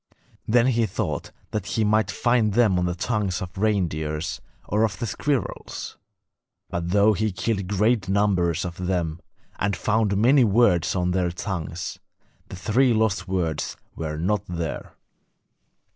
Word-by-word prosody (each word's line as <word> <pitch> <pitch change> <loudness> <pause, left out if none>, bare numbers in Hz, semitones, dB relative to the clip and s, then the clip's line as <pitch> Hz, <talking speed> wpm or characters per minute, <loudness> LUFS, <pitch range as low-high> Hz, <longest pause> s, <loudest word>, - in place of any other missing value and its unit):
Then 120 +2 +4
he 120 -3 +2
thought 90 - -3 0.2
that 105 -3 -3
he 110 - 0
might 110 -2 +2
find 110 0 +1
them 110 -7 +4
on 90 - +1
the 90 - -2
tongues 100 -2 -1
of 90 -1 -7
reindeers 90 -5 -1 0.3
or 105 +3 +2
of 110 -2 0
the 120 - -3
squirrels; 135 +1 -3 0.8
but 85 0 -2
though 105 +3 +4
he 110 +1 0
killed 100 0 -2
great 105 0 +1
numbers 95 -4 +2
of 90 0 -5
them, 85 -3 -1 0.4
and 100 0 0
found 105 -2 +1
many 130 +5 +5
words 100 -6 +3
on 90 -1 +1
their 90 -1 +1
tongues, 85 -2 -4 0.5
the - - -7
three 120 +6 +2
lost 105 -4 +1
words 85 -5 -2 0.2
were 75 -1 -4
not 95 +5 0
there. 85 -3 -5
100 Hz, 145 wpm, -24 LUFS, 90-110 Hz, 0.8 s, many